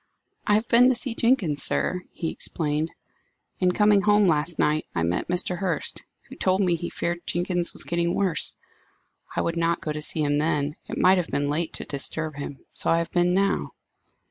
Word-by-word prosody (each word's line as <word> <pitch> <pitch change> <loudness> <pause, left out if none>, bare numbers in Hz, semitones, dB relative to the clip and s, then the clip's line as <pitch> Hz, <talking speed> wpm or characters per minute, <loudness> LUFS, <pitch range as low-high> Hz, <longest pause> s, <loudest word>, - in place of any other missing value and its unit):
"I 205 - +4
have 220 +2 0
been 245 +2 +6
to 260 - +2
see 250 -1 -1
Jenkins, 215 - +3
sir," 180 - +1
he 165 - -4
explained. 155 0 -2 0.7
"In 185 -1 +3
coming 210 +1 +4
home 205 0 +4
last 160 +1 +1
night, 155 +1 +1
I 85 - 0
met 85 +2 -1
Mr. 180 0 0
Hurst, 180 -6 -1 0.3
who - - -11
told 185 0 +1
me 185 -3 +2
he 170 +1 -3
feared 175 0 -3
Jenkins 175 0 -1
was - - -4
getting 170 0 -1
worse. 190 -5 +1 0.8
I - - +1
would 165 0 -2
not 170 0 +1
go 155 - -4
to 150 0 -4
see 155 +1 +2
him 145 0 +1
then; 150 -1 0
it - - -4
might 185 0 +4
have 175 - -2
been 145 0 -1
late 160 +2 -2
to - - -5
disturb 155 +2 -1
him, 140 -1 -7
so - - -2
I 165 - +4
have 170 0 -2
been 175 0 +2
now." 195 +1 0
170 Hz, 200 wpm, -25 LUFS, 155-190 Hz, 0.8 s, been